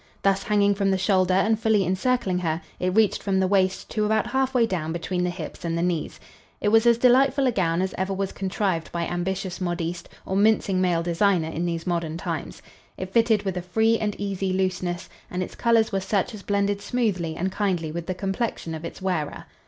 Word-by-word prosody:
Thus 195 0 +3
hanging 205 -1 +3
from 200 0 0
the 190 - +2
shoulder 185 -1 +2
and 215 +3 +2
fully 220 -3 +2
encircling 190 +1 0
her, 165 -2 -1 0.2
it 180 - +1
reached 220 -2 +3
from 195 -1 0
the 190 - +3
waist 190 -1 +1
to 215 - 0
about 215 0 +2
half 265 +2 0
way 240 -2 +5
down 170 -7 -2
between 180 +2 -2
the 180 - +1
hips 175 -3 -7
and 165 -1 -1
the 170 - 0
knees. 175 -3 -2 0.4
It 210 - +1
was 225 +2 +4
as 235 -1 +6
delightful 265 +3 +4
a 255 - +3
gown 180 -4 +1
as 190 - -2
ever 190 +1 -1
was 195 0 -2
contrived 190 -3 -2
by 170 -1 -2
ambitious 185 +2 -3
modiste 175 -1 -3 0.2
or 190 - -2
mincing 200 -2 +3
male 175 -2 +2
designer 175 -1 +2
in 165 +2 -2
these 165 -1 -3
modern 170 -3 -1
times. 165 -3 -5 0.3
It 185 0 -6
fitted 225 -3 +3
with 190 -2 -2
a - - -1
free 220 +6 +2
and 210 -1 -1
easy 195 -2 -2
looseness 185 -2 -1 0.2
and 180 0 -2
its - - -8
colors 230 -2 +2
were 195 - 0
such 195 +3 0
as 210 - -8
blended 200 0 0
smoothly 200 -9 -1
and 185 +3 -2
kindly 180 -6 -1
with 170 +1 -5
the 185 - -2
complexion 195 -3 -3
of 160 0 -6
its 180 - -7
wearer. 175 -6 -2
190 Hz, 215 wpm, -25 LUFS, 175-210 Hz, 0.4 s, as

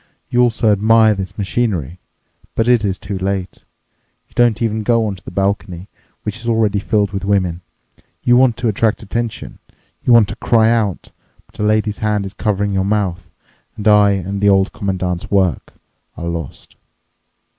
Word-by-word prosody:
You 125 - +3
also 115 -2 +2
admire 110 +2 +4
this 95 -2 -6
machinery. 95 - -2 0.6
But 115 - +1
it 120 -3 +4
is 95 -2 -1
too 95 -1 -6
late. 95 -1 -4 0.6
You - - -28
don't 120 -2 +2
even 110 -2 -1
go 115 +1 +2
onto 100 -4 -4
the - - -9
balcony, 95 -1 -2 0.3
which 105 +2 -4
is 115 - -8
already 110 -3 +1
filled 100 0 0
with 95 -1 -4
women. 95 -3 0 0.6
You 120 - +4
want 125 -2 +4
to 120 - -1
attract 110 +1 0
attention. 115 +2 -4 0.4
You - - +2
want 115 -3 +6
to 105 - -5
cry 115 -1 +3
out. 110 -6 -1 0.3
But - - -21
a - - -1
lady's 105 0 +1
hand 105 -2 0
is 95 - -7
covering 100 -1 -1
your 95 0 +1
mouth, 95 -3 -1 0.5
and 105 - -3
I 105 -1 +5
and 100 +1 -3
the 100 - +4
Old 95 0 +2
Commandant's 90 -3 -3
work 95 -4 0 0.4
are 85 - -6
lost." 85 -4 -6
105 Hz, 170 wpm, -17 LUFS, 95-110 Hz, 0.6 s, want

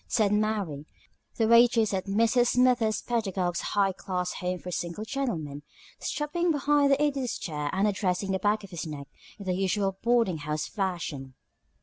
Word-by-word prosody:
said 210 -3 +2
Mary, 205 -9 -1 0.5
the 225 - +2
waitress 235 -2 +5
at 190 +1 -2
Mrs. 230 +4 +3
Smithers 245 -4 +3
Pedagog's 190 -7 -1 0.2
High 195 -1 +4
Class 180 -1 -3
Home 180 0 -1
for 180 +1 -8
Single 175 +5 -4
Gentlemen, 170 - -3 0.4
stopping 340 +4 -1
behind 290 -1 +3
the 275 - +4
Idiot's 275 -5 -1
chair 150 -4 -3
and 195 +2 +1
addressing 195 -1 -1
the 190 - 0
back 210 +2 +1
of 195 - -11
his 170 -2 -5
neck 145 -2 -7 0.3
in 200 - -9
the 185 - 0
usual 195 +1 0
boarding 230 -8 +2
house 150 +1 -2
fashion. 170 -9 -4
200 Hz, 160 wpm, -28 LUFS, 180-235 Hz, 0.5 s, waitress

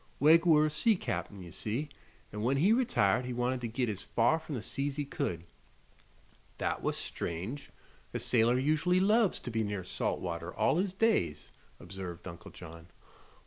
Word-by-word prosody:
Wegg 165 +4 +6
were 155 -2 +6
a - - +1
sea 220 +8 +3
cap'n, 100 - -4
ye 85 - -10
see, 115 - -3 0.5
an' 105 - -4
when 130 +5 +2
he 190 +10 +4
retired 225 - +2
he 125 0 -4
Wanted 125 +1 -1
to 120 - -2
git 120 +2 -1
as 105 -3 -3
far 120 +8 +2
from 155 -2 -6
the 120 - -3
sea's 140 +3 -2
he 145 -1 -2
could." 85 -11 -3 1.1
"That - - -1
was - - -1
strange. 95 - -5 0.4
A - - -3
sailor 120 +1 +3
usually 155 +7 +2
loves 210 +1 +3
to 120 - -5
be 110 0 0
near 100 -3 -3
salt 90 - -2
water 85 -1 -4
all 135 +8 +2
his 190 +1 0
days," 190 - 0 0.3
observed 90 -1 -8
Uncle 85 -1 -9
John. 85 +1 -11
125 Hz, 180 wpm, -31 LUFS, 95-155 Hz, 1.1 s, Wegg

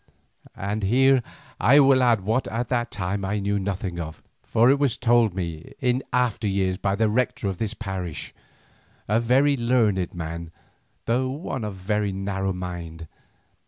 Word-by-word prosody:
And 100 +2 -2
here 130 +6 +4 0.4
I 140 +4 +6
will 135 -2 +5
add 120 -4 +3
what 110 +7 0
at 115 +2 -3
the 120 -1 0
time 100 0 -3
I 100 +2 -1
knew 100 0 0
nothing 95 -2 -3
of, 80 -1 -7 0.2
for 120 +3 +3
it 140 - +2
was 140 -5 +1
told 120 -5 +3
me 85 -4 -5
in 125 -2 +1
after 120 -4 +1
years 95 -2 0
by 95 0 0
the 110 +2 +2
Rector 115 -1 0
of 95 -2 -3
this 110 -1 -2
parish, 95 -7 -5 0.7
a 110 +3 +2
very 135 +5 +3
learned 115 -8 +1
man, 85 0 -5 0.6
though 125 +3 +1
one 135 -3 -4
of 95 -3 -7
narrow 95 -2 -1
mind. 85 -3 -6
105 Hz, 160 wpm, -24 LUFS, 95-120 Hz, 0.7 s, I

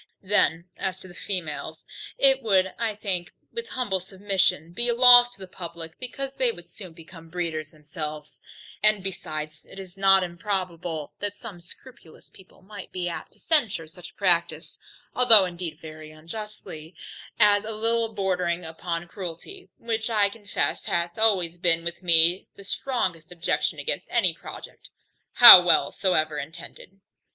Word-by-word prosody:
Then 180 -3 +1
as 190 -1 -3
to - - -11
the 175 - -14
females, 160 -4 -6 0.3
it 270 -1 +3
would, 190 -4 +1
I 225 -3 -2
think, 190 -4 -4 0.2
with 465 0 -5
humble 225 - -2
submission, 190 -3 -1
be 240 +5 -2
a 235 - +1
loss 245 0 +8
to - - -22
the 190 - -9
publick, 170 -2 -10
because 270 +2 -6
they 260 -3 +1
soon 185 +3 -11
would 165 - -18
become 165 0 -14
breeders 160 -3 -4
themselves: 150 -1 -9 0.4
and 215 -2 +2
besides, 155 -5 -7
it - - -16
is 190 -1 -11
not 195 -1 +4
improbable 175 -3 -5
that 205 0 -5
some 200 -7 -11
scrupulous 235 0 -16
people 190 -1 -20
might 200 0 -11
be 180 -1 -4
apt 170 - -8
to - - -21
censure 240 - 0
such 175 +2 -12
a - - -24
practice, 170 -4 -1 0.3
(although 230 -6 +7
indeed 175 -3 -7
very 155 -1 -11
unjustly) 165 -1 -10 0.4
as 205 -1 +4
a 215 - -7
little 225 +1 -1
bordering 180 -4 -2
upon 170 +1 -5
cruelty, 190 - -9
which, 225 0 -3
I 210 -3 +2
confess, 205 -1 -3
hath 170 +3 -2
always 180 -6 +1
been 165 -1 +2
with 170 +1 -4
me 170 +1 +4
the 200 - -13
strongest 190 - -3
objection 175 -1 -1
against 485 - -3
any - - +1
project, - - -12 0.4
how 240 -7 +12
well 175 - +3
soever 155 -6 0
intended. 170 +5 -11
185 Hz, 155 wpm, -24 LUFS, 165-210 Hz, 0.4 s, how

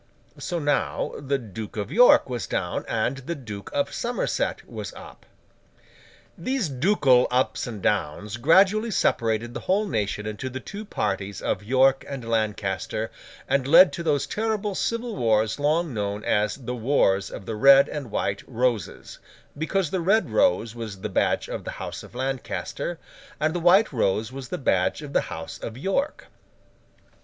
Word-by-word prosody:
So 175 - -3
now 145 -2 0
the 140 0 -1
Duke 110 -3 -8
of 100 -1 -3
York 245 +3 +6
was 120 -7 -4
down, 90 -1 -2
and 115 +4 0
the 135 +6 -5
Duke 105 -8 -8
of 140 - -1
Somerset 245 - -2
was - - -6
up. - - -13 1.1
These 255 - -1
ducal 135 -3 +3
ups 125 +1 0
and 110 -5 -7
downs 105 +9 -1
gradually 190 - +4
separated 115 - 0
the - - -4
whole 200 +3 +1
nation 105 - -2
into 110 +5 -4
the 130 +1 -5
two 210 - -8
parties 100 - -2
of - - -1
York 130 +4 +3
and 130 -4 -6
Lancaster, 110 -1 -1 0.4
and 135 -1 +1
led 175 +5 +8
to - - -4
those 150 -4 +1
terrible 215 -1 -2
civil 230 +3 -2
wars 110 - +1
long 155 +1 +1
known 105 -1 -3
as 105 0 +1
the 125 -2 -6
Wars 110 -6 +2
of 95 - -8
the 110 - -4
Red 135 +5 +7
and 140 -5 -5
White 100 -1 -1
Roses, 120 -3 -2 0.4
because 160 +2 -1
the 185 - -1
red 205 +6 +2
rose 115 - +2
was 110 -5 -7
the - - -3
badge - - +1
of - - -5
the - - -5
House - - -6
of - - -14
Lancaster, 130 - -3 0.4
and 155 +1 +1
the 175 - -1
white 180 +3 +5
rose 110 -1 0
was 130 -2 -8
the - - -3
badge 95 +1 +1
of 145 -1 -8
the - - +3
House 80 -1 -7
of 115 - -6
York. 195 - -1
130 Hz, 165 wpm, -25 LUFS, 110-170 Hz, 1.1 s, led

